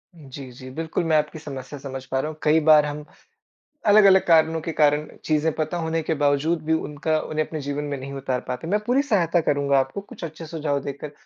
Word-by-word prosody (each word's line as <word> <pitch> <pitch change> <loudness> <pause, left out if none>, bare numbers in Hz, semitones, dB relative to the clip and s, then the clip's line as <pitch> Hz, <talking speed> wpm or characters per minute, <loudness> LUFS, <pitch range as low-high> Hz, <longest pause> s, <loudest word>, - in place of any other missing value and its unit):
उ, - - -18
जी, 130 -1 -9
जी 130 +1 -11
बिल्कुल 165 +2 -2
मैं 160 -2 +3
आपकी 150 +1 -2
समस्या 140 -1 -8
समझ 135 -1 -7
पा 130 - -2
रहा 150 - -2
हूँ, 155 - -13
कई 155 +1 +4
बार 150 -1 +7
हम, 150 0 -5 0.8
अलग-अलग 200 -2 +6
कारणों 160 -1 +4
के 165 - -4
कारण 150 -1 +2 0.2
चीज़ें 155 +1 +1
पता 155 +3 -2
होने 165 -1 -1
के 160 - -1
बावजूद 145 +3 +2
भी 160 - +1
उनका 155 0 -1
उन्हें 155 0 -2
अपने 155 -2 -6
जीवन 145 +1 -3
में 145 -1 -3
नहीं 135 +1 -7
उतार 135 -2 -2
पाते। 125 +5 -4
मैं 205 +4 +1
पूरी 255 +3 +3
सहायता 180 - +1
करूँगा 140 -2 +2
आपको 135 +9 -2
कुछ 205 0 -12
अच्छे 165 0 -7
सुझाव 150 -3 -2
देकर 140 +1 -6
155 Hz, 220 wpm, -23 LUFS, 140-165 Hz, 0.8 s, बार